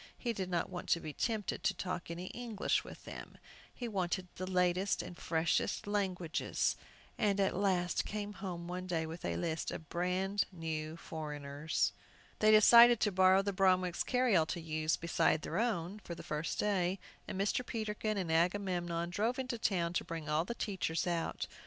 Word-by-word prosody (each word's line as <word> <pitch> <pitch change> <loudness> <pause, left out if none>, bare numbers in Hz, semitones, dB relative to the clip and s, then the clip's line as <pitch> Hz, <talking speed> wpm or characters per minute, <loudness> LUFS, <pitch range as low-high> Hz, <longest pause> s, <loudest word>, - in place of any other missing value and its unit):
He 240 -2 -2
did 190 -4 -3
not 175 -2 0
want 180 - -6
to 170 - +4
be 155 -2 -6
tempted 220 - -2
to 195 - +2
talk 180 -2 -4
any 170 +2 -5
English 235 -4 -1
with - - -11
them. - - -9 0.3
He 245 - -5
wanted 185 -3 -2
the 185 +1 -5
latest 180 +1 +2
and 180 - -8
freshest 165 -1 0
languages, 190 -5 0 0.4
and 205 -3 +2
at 195 - +2
last 180 -2 +1
came 210 0 -4
home 175 -4 -6
one 180 +1 -4
day 165 -3 0
with 165 +2 -7
a - - -1
list 165 -2 -2
of 155 - -7
"brand 185 +3 0
new 160 -2 -4
foreigners." 150 -1 -2 0.5
They 215 - +5
decided 235 +2 +8
to 210 - +3
borrow 190 +1 +5
the 200 0 -1
Bromwicks' 185 -2 +2
carryall 245 -11 +3
to 175 - -3
use, 155 -1 0
beside 165 -2 +1
their 170 - -2
own, 205 -4 -1
for 170 -4 -7
the - - -9
first 150 +2 -3
day, 190 -3 +1 0.3
and 190 - -4
Mr. 205 +5 +1
Peterkin 215 -2 -2
and 180 -4 -1
Agamemnon 175 -1 0
drove 225 +6 0
into 255 -3 -3
town 175 -6 +1
to - - 0
bring 165 -2 -6
all 155 +2 +1
the 235 - -4
teachers 190 -7 -1
out. 170 -2 -1
180 Hz, 175 wpm, -34 LUFS, 170-205 Hz, 0.5 s, decided